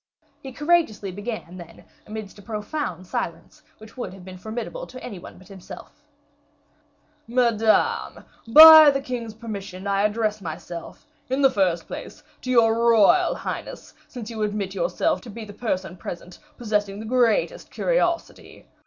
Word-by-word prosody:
He 270 - -8
courageously 295 - 0
began, 205 -3 -7
then, 170 -2 -13 0.2
amidst 215 -2 -8
a - - -12
profound 210 - -5
silence, - - -5 0.2
which 220 0 -15
would 240 -6 -6
have 185 -2 -14
been 185 -1 -10
formidable 240 - -6
to 255 - -11
any 205 -7 -7
one - - -12
but 185 0 -17
himself: 195 +9 -12 1.3
"Madame, 230 -2 +1 0.2
by 315 +4 +11
the 275 -1 +1
king's 240 -5 -6
permission, 200 -4 -8
I 200 0 +1
address 215 0 0
myself, 170 - -8 0.2
in 265 +2 0
the 270 - +6
first 180 -4 0
place, 300 - -9 0.2
to 255 - -7
your 230 -3 +4 0.2
royal 220 -4 +4
highness, - - -7
since 240 -3 -8
you 220 -1 -6
admit 205 -2 -2
yourself - - -1
to 245 - -12
be 225 +1 -8
the 205 - -11
person 190 -5 -3
present 175 +1 -9 0.2
possessing 210 -4 -1
the 220 - -7
greatest 255 - +1
curiosity. 355 -9 -2
220 Hz, 150 wpm, -23 LUFS, 195-250 Hz, 1.3 s, by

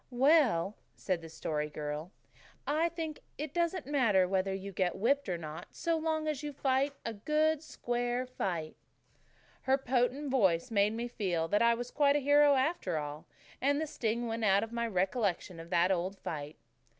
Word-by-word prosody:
"Well," 250 - +3 0.2
said 185 -3 -2
the 165 - -9
Story 150 -1 -3
Girl, 150 +3 -5 0.5
"I 315 +4 +1
think 325 -3 -5 0.2
it 300 0 -5
doesn't 340 -1 0
matter 230 -10 +3
whether 190 +1 0
you 195 +1 -5
get 185 -1 0
whipped 275 +3 +1
or 175 - -1
not 155 -1 -8
so 335 0 0
long 315 -1 -1
as 300 -3 -1
you 295 -1 -4
fight 270 +1 +1
a 230 - -2
good, 305 +7 +1
square 245 -4 -2
fight." 175 -11 -3 0.9
Her 265 0 +2
potent 265 +2 0
voice 195 -4 +2
made 205 0 +3
me 235 +2 -3
feel 180 -9 -1
that 205 - +2
I 235 0 +5
was 245 +1 -6
quite 285 -1 +3
a - - +3
hero 290 +1 +5
after 270 - 0
all, 150 0 -5 0.3
and 285 +2 +2
the 315 - -1
sting 235 -4 -2
went 225 0 -3
out 200 0 +4
of 225 - -6
my 235 0 -1
recollection 190 -3 -1
of 165 +1 -10
that 175 +1 +3
old 185 +2 -1
fight. 150 -3 -6
235 Hz, 180 wpm, -32 LUFS, 185-285 Hz, 0.9 s, I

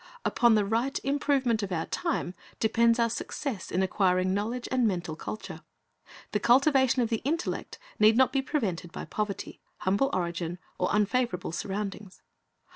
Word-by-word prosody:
Upon 235 -2 +4
the 210 -1 +2
right 235 +7 0
improvement 275 -4 +1
of 200 -2 -4
our 165 -2 -1
time 335 - -2 0.3
depends 230 +1 +3
our 235 -1 +3
success 230 - -4
in 185 - +1
acquiring 185 -1 +2
knowledge 230 +5 -2
and 255 -3 +3
mental 175 -5 -2
culture. 215 +6 -7 0.7
The 210 - +1
cultivation 265 +1 +4
of 230 - -1
the 225 - +1
intellect 325 +6 -2 0.2
need 220 +1 +6
not 260 0 +4
be 270 - +2
prevented 195 - -2
by - - -6
poverty, 210 -2 -4 0.2
humble 200 +9 +2
origin, 170 -1 -2 0.2
or 180 - +1
unfavorable 210 -2 0
surroundings. 200 +1 -5
215 Hz, 150 wpm, -28 LUFS, 190-250 Hz, 0.7 s, need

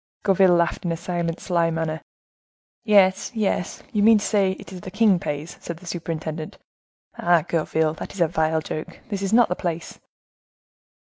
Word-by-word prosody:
Gourville 190 -2 +5
laughed 170 +3 +1
in 175 - -1
a 165 - -2
silent, 170 -1 -3
sly 170 -3 +1
manner. 160 -1 -2 0.8
"Yes, 195 -3 +4
yes, 205 -4 -1
you 210 - +1
mean 220 +1 +7
to 205 - -2
say 195 -3 +2
it 190 - -11
is 180 - -8
the 185 - -7
king 205 -2 +3
pays," 150 +1 -5
said 170 - -6
the 180 - -15
superintendent. 160 -2 -5 0.6
"Ah, 175 -2 +3
Gourville, 160 -1 0
that - - -6
is 195 - -5
a 170 - +5
vile 160 -1 0
joke; 155 0 -6
this 200 -2 -3
is 195 0 -1
not 235 +1 +5
the 180 - -2
place." 170 -2 -4
175 Hz, 180 wpm, -23 LUFS, 160-195 Hz, 0.8 s, mean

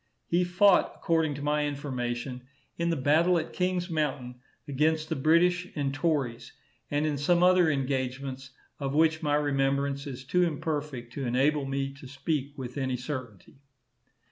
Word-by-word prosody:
He 175 +1 +2
fought, 180 +2 +4
according 160 -3 0
to 140 - -6
my 150 0 +1
information, 125 -3 -4 0.3
in 170 0 -1
the 165 - +1
battle 160 +6 +3
at 160 - -3
Kings 180 -1 0
Mountain 135 -7 -3 0.3
against 155 +3 +1
the - - 0
British 175 +5 +3
and 140 -3 -1
tories, 140 -6 -1 0.4
and 145 +1 0
in 150 -2 -1
some 175 +4 +3
other 180 -2 +5
engagements 130 -1 -2 0.3
of 140 -1 -2
which 160 0 +3
my 145 -2 +1
remembrance 140 -1 0
is 130 -2 -7
too 180 +7 +1
imperfect 150 -7 -2
to 140 - -4
enable 135 +4 +2
me 135 0 -2
to 140 -1 -12
speak 140 +1 -3
with 130 +1 -5
any 130 -2 -1
certainty. 125 -5 -7
145 Hz, 155 wpm, -28 LUFS, 135-160 Hz, 0.4 s, other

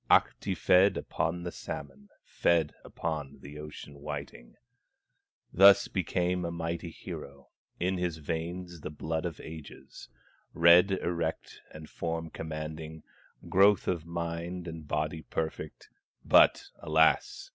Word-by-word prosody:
Ahti - - +3
fed 95 +2 +4
upon 85 +1 -2
the 85 - -4
salmon, 70 -4 -8
Fed 85 -3 +1
upon 75 -4 -4
the 75 +2 -10
ocean 75 -1 -10
whiting, 70 -4 -7 1.0
Thus 100 +2 +7
became 90 0 -1
a 85 - -2
mighty 85 0 -4
hero, 70 -3 -9 0.3
In 90 +1 0
his 90 -2 -1
veins 85 +2 -5
the - - -5
blood 80 +2 -3
of 80 - -8
ages, 80 -2 -11 0.5
Head 85 +3 +7
erect 85 -3 -2
and 80 0 -10
form 80 -1 -4
commanding, 80 0 -6 0.4
Growth 100 +2 +4
of 85 -3 -1
mind 85 +1 -4
and 80 -2 -7
body 75 +2 -2
perfect; 80 0 -5 0.3
But - - +5
alas! 80 +1 +2
80 Hz, 120 wpm, -30 LUFS, 75-85 Hz, 1.0 s, Thus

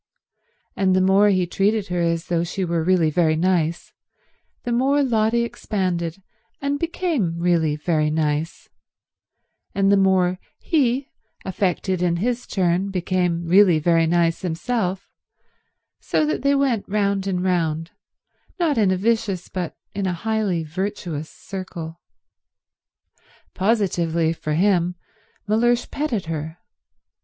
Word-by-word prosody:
And 190 -1 +2
the - - +4
more 195 +2 +4
he 185 -2 +2
treated 200 +3 0
her 175 -1 -1
as 165 -1 0
though 170 -1 0
she 180 +2 -3
were 170 -1 -1
really 170 -3 +3
very 160 -1 +2
nice, 170 -1 0 0.7
the 240 - -3
more 270 +4 +2
Lotty 235 -2 +2
expanded 185 -6 -3 0.4
and 280 +1 -1
became 320 - -1
really 170 -3 +1
very 155 0 0
nice, 155 +1 -2 1.1
and 195 0 +3
the 200 - +5
more 185 -2 +2 0.2
he, 270 -4 0 0.4
affected 185 -1 -1
in 175 -1 +2
his 240 +7 -2
turn, 185 +1 0
became 180 -2 -1
really 180 0 +5
very 165 +1 +2
nice 170 0 +1
himself; 190 +2 -2 0.9
so 310 - 0
that 305 - -1
they 280 0 +3
went 260 -8 0
round 200 -1 0
and 180 -2 -1
round, 165 -3 0 0.7
not 310 -8 +2
in 205 -3 +3
a 185 - +1
vicious 210 -3 -1
but 180 -3 -4 0.2
in 195 -1 -2
a 180 - 0
highly 205 -2 -1
virtuous 165 -2 -4
circle. 175 -4 -8 1.5
Positively, 175 -6 +1
for 155 -2 -4
him, 180 -1 +2 0.5
Mellersh 235 +3 +2
petted 260 - -2
her. 160 0 -5
185 Hz, 130 wpm, -22 LUFS, 170-210 Hz, 1.5 s, the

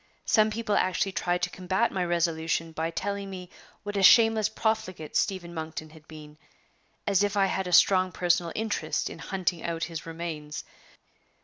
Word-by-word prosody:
Some 215 -1 +4
people 215 -1 -1
actually 185 +1 +1
tried 180 -1 -1
to - - 0
combat 190 +5 0
my 185 - -1
resolution 165 -1 0
by 160 +1 -2
telling 200 +3 -3
me 180 -2 -8 0.3
what 205 0 -5
a 200 - +1
shameless 220 +1 +6
profligate 215 -8 -2
Stephen 185 -4 -1
Monkton 160 -1 -6
had 155 -1 -17
been 155 -1 -12 0.7
as 200 -2 +2
if 205 0 0
I 195 - +4
had 190 -1 -1
a - - -4
strong 185 +1 +5
personal 175 -1 +1
interest 215 -7 -2
in - - -9
hunting 180 -2 -2
out 165 -1 -3
his 165 -1 -5
remains! 160 -3 -6
180 Hz, 170 wpm, -27 LUFS, 165-200 Hz, 0.7 s, shameless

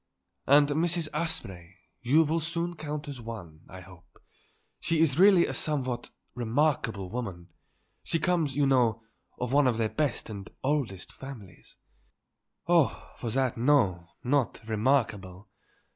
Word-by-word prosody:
"And 145 +1 +6
Mrs. 165 +2 +1
Asprey 95 - -2 0.3
you 145 +7 +4
will 160 +2 0
soon 170 +2 -2
count 150 -1 -5
as 135 -4 -7
one, 95 -9 -9
I 95 0 -10
hope. 90 -1 -17 0.6
She 165 -1 0
is 155 -2 +3
really 190 -2 +7
a - - -4
somewhat 130 -5 -1 0.2
remarkable 120 -5 0
woman. 95 -8 -5 0.5
She - - 0
comes, 165 -5 0
you 145 -1 +2
know, 120 -4 +2 0.3
of 125 +1 -3
one 145 -1 +5
of 120 -3 +1
their 110 -1 0
best 150 -1 -2
and 100 -2 -8
oldest 130 -10 -2
families." 120 -10 -12 0.9
"Oh, 170 -4 +2
for 120 - -4
that, 130 +1 0
no; 110 -11 +2 0.2
not 125 -4 0
remarkable. 105 -5 0
130 Hz, 135 wpm, -28 LUFS, 110-150 Hz, 0.9 s, really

